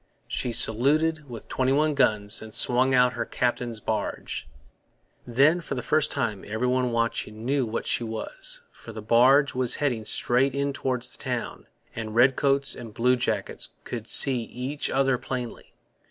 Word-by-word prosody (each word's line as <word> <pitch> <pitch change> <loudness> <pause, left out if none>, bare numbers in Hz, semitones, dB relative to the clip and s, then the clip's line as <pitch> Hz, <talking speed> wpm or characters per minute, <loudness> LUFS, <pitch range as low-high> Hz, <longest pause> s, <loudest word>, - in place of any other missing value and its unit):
She 125 - -2
saluted 145 +7 +2
with 115 -2 -9
twenty 130 0 0
one 150 +2 +2
guns 105 -5 +1
and 110 0 -7
swung 130 +2 +4
out 125 0 +4
her 120 - -2
captain's 120 -2 -2
barge. 105 - -4 0.8
Then, 140 +8 +3
for 150 - -5
the 125 - -4
first 155 +2 +1
time, 110 -8 -2
every 110 +4 -2
one 125 0 +1
watching 115 -1 -2
knew 135 -1 0
what 110 - -4
she - - 0
was; - - -5
for 115 - -12
the 110 - -7
barge 130 +6 +4
was 125 -1 0
heading 125 -7 -1
straight 125 +4 +1
in 140 0 -1
towards 125 -2 -2
the - - -13
town, - - -4 0.3
and 110 -1 -5
redcoats 135 +3 +3
and 115 -4 -10
bluejackets 125 +1 0
could 115 -2 -7
see 130 -3 +5
each 130 +5 -4
other 135 -2 +1
plainly. 125 -3 -6
125 Hz, 160 wpm, -25 LUFS, 115-140 Hz, 0.8 s, see